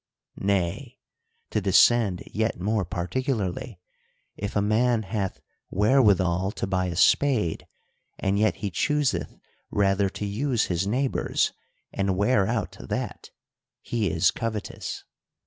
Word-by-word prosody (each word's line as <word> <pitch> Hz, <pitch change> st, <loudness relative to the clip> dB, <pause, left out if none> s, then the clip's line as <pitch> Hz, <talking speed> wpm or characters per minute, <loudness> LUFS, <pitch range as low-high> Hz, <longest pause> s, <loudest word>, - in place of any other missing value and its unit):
— -, -, -54 dB, 0.2 s
Nay, 85 Hz, -3 st, -2 dB, 0.5 s
to 105 Hz, -, 0 dB
descend 100 Hz, 0 st, +4 dB
yet 110 Hz, -2 st, -2 dB
more 105 Hz, +2 st, 0 dB
particularly; 95 Hz, -, -3 dB, 0.6 s
if 100 Hz, 0 st, -5 dB
a -, -, +3 dB
man 110 Hz, +2 st, +2 dB
hath 100 Hz, -2 st, -3 dB, 0.3 s
wherewithal 100 Hz, -5 st, +3 dB
to -, -, -3 dB
buy 95 Hz, -1 st, 0 dB
a 85 Hz, -, -4 dB
spade, 110 Hz, -, +2 dB, 0.5 s
and 100 Hz, +1 st, 0 dB
yet 110 Hz, -4 st, +3 dB
he 100 Hz, -3 st, -4 dB
chooseth 135 Hz, -, 0 dB, 0.3 s
rather 100 Hz, -1 st, +2 dB
to 105 Hz, -, -5 dB
use 115 Hz, +4 st, 0 dB
his 90 Hz, +2 st, -1 dB
neighbor's 130 Hz, +5 st, 0 dB, 0.4 s
and 95 Hz, -1 st, 0 dB
wear 100 Hz, -1 st, +3 dB
out 110 Hz, -4 st, -2 dB
that, -, -, -5 dB, 0.5 s
he 110 Hz, -5 st, -1 dB
is 80 Hz, +2 st, +3 dB
covetous. 110 Hz, -2 st, -5 dB
100 Hz, 125 wpm, -26 LUFS, 95-115 Hz, 0.6 s, descend